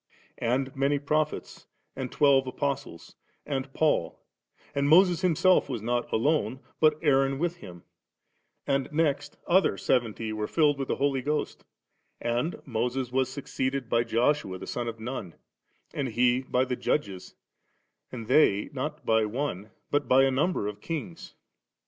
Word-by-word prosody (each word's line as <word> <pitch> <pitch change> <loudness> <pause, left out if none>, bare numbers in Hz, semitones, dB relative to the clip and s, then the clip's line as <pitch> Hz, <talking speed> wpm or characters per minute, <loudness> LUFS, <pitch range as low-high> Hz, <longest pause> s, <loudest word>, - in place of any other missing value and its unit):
And 130 +3 -1
many 140 +2 +1
Prophets, 150 +1 -2 0.3
and 130 -2 -5
twelve 135 -2 +4
Apostles, 135 - -4 0.3
and 135 -2 -3
Paul 140 - 0 0.5
And 140 0 +1
Moses 175 +1 +5
himself 185 -2 +3
was 120 -5 -4
not 120 +1 -1
alone, 135 +2 +1 0.2
but 155 -1 +4
Aaron 135 -2 +3
with 175 +3 -1
him, 85 - -12 0.8
and 135 0 0
next 150 -2 0
other 180 - +3
seventy 115 -3 0
were 105 0 -3
filled 150 -3 +2
with 135 - -2
the - - 0
Holy 135 -1 0
Ghost 150 +3 -2 0.6
And 120 +8 -2
Moses 125 +1 -2
was 130 0 0
succeeded 130 -2 -3
by 115 +1 +3
Joshua 120 -4 0
the - - -8
son 120 -1 -3
of 115 -1 -5
Nun, 110 -7 -6 0.6
and 140 - -2
he 125 +2 +2
by 130 0 0
the 125 -1 -2
Judges, 100 -9 -2 0.8
and 115 -3 -6
they 110 -5 +3
not 150 +3 -4
by 110 -1 +3
one, 110 -3 -3 0.2
but 145 0 +1
by 130 +1 +5
a 135 - +3
number 145 - 0
of 105 0 -6
Kings. 165 +1 -6
135 Hz, 150 wpm, -27 LUFS, 120-145 Hz, 0.8 s, Moses